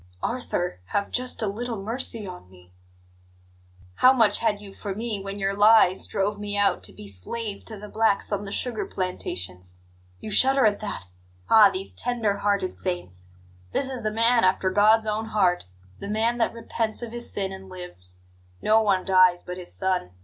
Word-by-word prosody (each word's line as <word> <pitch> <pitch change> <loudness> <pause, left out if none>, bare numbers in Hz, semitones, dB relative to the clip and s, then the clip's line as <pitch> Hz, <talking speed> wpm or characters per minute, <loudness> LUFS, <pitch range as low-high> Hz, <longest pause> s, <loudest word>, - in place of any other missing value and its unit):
"Arthur, 180 - -2
have 200 - -2
just 250 -1 -2
a - - +1
little 230 +2 -4
mercy 225 +1 -2
on 180 - -9
me 90 -1 -19 0.6
" 90 0 -29
"How 255 - +8
much 225 -6 +3
had 220 -3 +1
you 200 -1 -11
for 195 -1 -5
me 220 -2 -3
when 195 +1 -6
your 195 0 0
lies 205 -2 +5
drove 205 +1 -1
me 205 0 -4
out 200 -2 +2
to - - -8
be 105 - -11
slave 200 - -5
to 220 - -4
the 210 +1 -9
blacks 220 -1 +1
on 205 0 -1
the 200 - -7
sugar 235 +1 -1
plantations? 90 - -5 0.4
You 215 - -7
shudder 265 +4 +5
at 205 -1 +2
that 205 - -5 0.5
ah, 215 -2 +8
these 195 0 -6
tender 230 -5 0
hearted 200 -3 0
saints! 90 - -5 0.5
This 275 - 0
is 255 -2 -5
the 215 - 0
man 230 +2 +3
after 185 0 +2
God's 215 +3 +4
own 215 +1 -1
heart 190 - +1 0.3
the - - -6
man 225 +3 0
that 230 - +2
repents 230 0 -3
of 235 - -6
his 240 0 -5
sin 195 -1 -2
and 190 0 -10
lives. 175 - -8 0.4
No 220 - +4
one 195 -4 +1
dies 185 -2 +4
but 180 0 -6
his 180 -1 -7
son. 185 - -1
205 Hz, 185 wpm, -25 LUFS, 185-220 Hz, 0.6 s, How